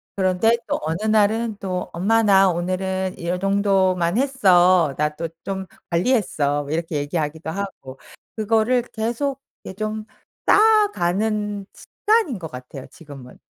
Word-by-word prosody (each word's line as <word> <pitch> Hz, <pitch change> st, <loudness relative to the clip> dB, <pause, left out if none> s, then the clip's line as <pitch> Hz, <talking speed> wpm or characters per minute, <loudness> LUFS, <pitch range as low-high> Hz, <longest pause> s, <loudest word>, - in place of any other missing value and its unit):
그런데 190 Hz, +4 st, +2 dB
또 -, -, -1 dB
어느 160 Hz, +6 st, -3 dB
날은 220 Hz, +1 st, +1 dB
또 185 Hz, -2 st, -4 dB
"엄마 225 Hz, +7 st, +2 dB
나 195 Hz, -2 st, +5 dB
오늘은 185 Hz, +2 st, -2 dB
요정도만 190 Hz, 0 st, +1 dB
했어. 185 Hz, -, +4 dB
나 150 Hz, 0 st, 0 dB
또 165 Hz, +2 st, -4 dB, 0.2 s
좀 190 Hz, -1 st, -4 dB, 0.3 s
관리했어." 170 Hz, -, +1 dB
뭐 140 Hz, -, -8 dB
이렇게 165 Hz, 0 st, -2 dB
얘기하기도 150 Hz, +2 st, -3 dB
하고. 165 Hz, -8 st, -7 dB, 0.4 s
그거를 225 Hz, +3 st, +2 dB
계속 240 Hz, +5 st, -2 dB, 0.3 s
예 -, -, -7 dB
좀 215 Hz, +2 st, -4 dB, 0.4 s
쌓아가는 215 Hz, -, +2 dB
습관인 425 Hz, -, 0 dB
것 165 Hz, -3 st, -7 dB
같아요 125 Hz, +1 st, -9 dB
지금은. 140 Hz, -6 st, -13 dB
190 Hz, 265 characters per minute, -22 LUFS, 170-220 Hz, 0.4 s, 나